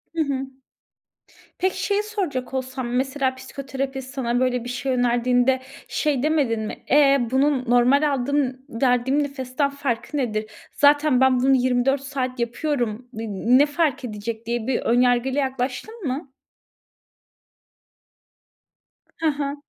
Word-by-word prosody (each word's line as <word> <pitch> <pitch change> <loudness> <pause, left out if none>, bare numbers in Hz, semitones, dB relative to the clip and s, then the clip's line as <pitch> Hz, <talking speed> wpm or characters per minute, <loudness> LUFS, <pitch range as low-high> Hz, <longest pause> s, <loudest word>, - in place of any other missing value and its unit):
Hı 325 - +1
hı. 270 -2 -2 1.1
Peki, 375 0 -1
şeyi 410 +1 +1
soracak 355 -13 -3
olsam 260 -1 -3
mesela 265 0 0
psikoterapist 270 0 -6
sana 245 -2 -1
böyle 250 -2 0
bir 245 - -6
şey 255 +2 -2
önerdiğinde 245 +1 +2 0.3
şey 290 -4 0
demedin 280 -8 +1
mi, 215 - -6
e, 280 -1 +6
bunun 270 -1 +2
normal 275 +4 +4
aldığım 265 0 0
verdiğim 255 +4 +1
nefesten 275 0 -2
farkı 280 0 -3
nedir? 215 -4 -2 0.2
Zaten 290 -2 +4
ben 260 -1 +4
bunu 265 +1 +4
24 255 +2 +2
saat 260 -2 -4
yapıyorum, 240 -2 -2
n 225 +1 -5 0.3
ne 290 - +6
fark 290 -3 0
edecek 220 +1 -5
diye 235 0 -2
bir 260 - 0
ön 240 +2 +3
yargıyla 250 +3 +2
yaklaştın 270 - -3
mı? 265 +1 -4 2.9
Hı 325 - 0
hı. 285 -1 -1
265 Hz, 130 wpm, -23 LUFS, 245-280 Hz, 2.9 s, e